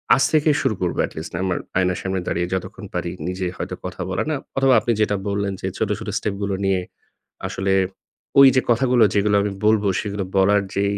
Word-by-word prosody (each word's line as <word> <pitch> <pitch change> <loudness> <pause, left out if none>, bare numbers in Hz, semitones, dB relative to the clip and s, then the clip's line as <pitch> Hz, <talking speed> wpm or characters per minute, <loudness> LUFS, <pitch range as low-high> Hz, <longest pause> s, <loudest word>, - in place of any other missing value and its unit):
আজ 135 - +2
থেকেই 155 -1 +4
শুরু 110 - +1
করবো। 90 -2 -1
এটলিস্ট 80 +6 -8
আমার 95 -2 0 0.2
আয়নার 90 -1 +1
সামনে 95 0 -2
দাঁড়িয়ে 85 +1 -1
যতক্ষণ 95 - -5
পারি - - -2 0.2
নিজে 90 +1 -3
হয়তো - - -4
কথা - - -6
বলার। 95 - -1
না - - 0 0.2
অথবা 135 -1 +4
আপনি 120 - -1
যেটা 105 -1 +2
বললেন 100 0 -1
যে, - - -2
"ছোট, 110 - -1
ছোট - - -8
স্টেপগুলো 100 -1 -2
নিয়ে 95 -1 +2 0.7
আসলে 95 0 -1 0.7
ওইযে 135 -1 +7
কথাগুলো 125 0 +3
যেগুলো 105 0 +2
আমি 105 - -1
বলবো," 105 -1 +3
সেগুলো 100 -1 -3
বলার 100 +2 +4
যে 100 - +1
100 Hz, 185 wpm, -22 LUFS, 95-110 Hz, 0.7 s, ওইযে